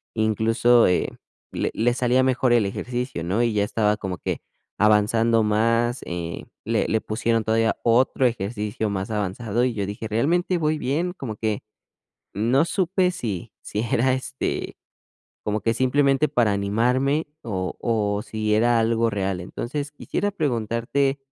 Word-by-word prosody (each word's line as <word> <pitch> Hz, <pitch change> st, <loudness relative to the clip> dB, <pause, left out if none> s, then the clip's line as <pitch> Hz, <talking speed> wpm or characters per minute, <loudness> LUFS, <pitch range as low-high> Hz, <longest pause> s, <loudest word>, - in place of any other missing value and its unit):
incluso, 115 Hz, +2 st, +3 dB
eh, 90 Hz, -, +1 dB, 0.4 s
le -, -, -2 dB
le 120 Hz, +2 st, +2 dB
salía 125 Hz, +1 st, +2 dB
mejor 130 Hz, -1 st, +2 dB
el 115 Hz, -4 st, +4 dB
ejercicio, 125 Hz, -2 st, -3 dB
¿no? 100 Hz, +8 st, +1 dB
Y 115 Hz, -2 st, +1 dB
ya 100 Hz, -1 st, +2 dB
estaba 105 Hz, 0 st, +1 dB
como 95 Hz, -4 st, -4 dB
que -, -, -3 dB, 0.4 s
avanzando 110 Hz, +2 st, +3 dB
más. 115 Hz, +3 st, +1 dB
Eh, 85 Hz, -1 st, -5 dB, 0.2 s
le 115 Hz, 0 st, +1 dB
le 110 Hz, -, +1 dB
pusieron 115 Hz, +1 st, 0 dB
todavía 115 Hz, 0 st, +2 dB
otro 125 Hz, +2 st, +3 dB
ejercicio 105 Hz, -1 st, -3 dB
más 100 Hz, +2 st, -3 dB
avanzado 105 Hz, +3 st, -1 dB
y 125 Hz, -, 0 dB
yo 100 Hz, -3 st, -2 dB
dije: 105 Hz, +2 st, -5 dB
"¿Realmente 170 Hz, -, +1 dB
voy 155 Hz, 0 st, +1 dB
bien?", 165 Hz, +7 st, -1 dB
como 120 Hz, -, -6 dB
que 110 Hz, -2 st, -1 dB, 0.7 s
no 120 Hz, +9 st, +3 dB
supe 185 Hz, 0 st, +1 dB
si 105 Hz, -, -5 dB
si 105 Hz, -, -3 dB
era, 120 Hz, +3 st, +1 dB
este, 130 Hz, 0 st, -3 dB, 0.7 s
como 105 Hz, 0 st, -1 dB
que 115 Hz, -, +1 dB
simplemente 135 Hz, +3 st, +2 dB
para 115 Hz, -4 st, +2 dB
animarme 125 Hz, +9 st, +1 dB, 0.2 s
o 95 Hz, -5 st, -3 dB
o 105 Hz, -3 st, 0 dB
si 110 Hz, -1 st, -1 dB
era 120 Hz, +2 st, +3 dB
algo 115 Hz, 0 st, +2 dB
real. 95 Hz, -3 st, -2 dB
Entonces, 140 Hz, +10 st, -5 dB
quisiera 205 Hz, +7 st, -2 dB
preguntarte 135 Hz, -, 0 dB
115 Hz, 150 wpm, -24 LUFS, 105-130 Hz, 0.7 s, el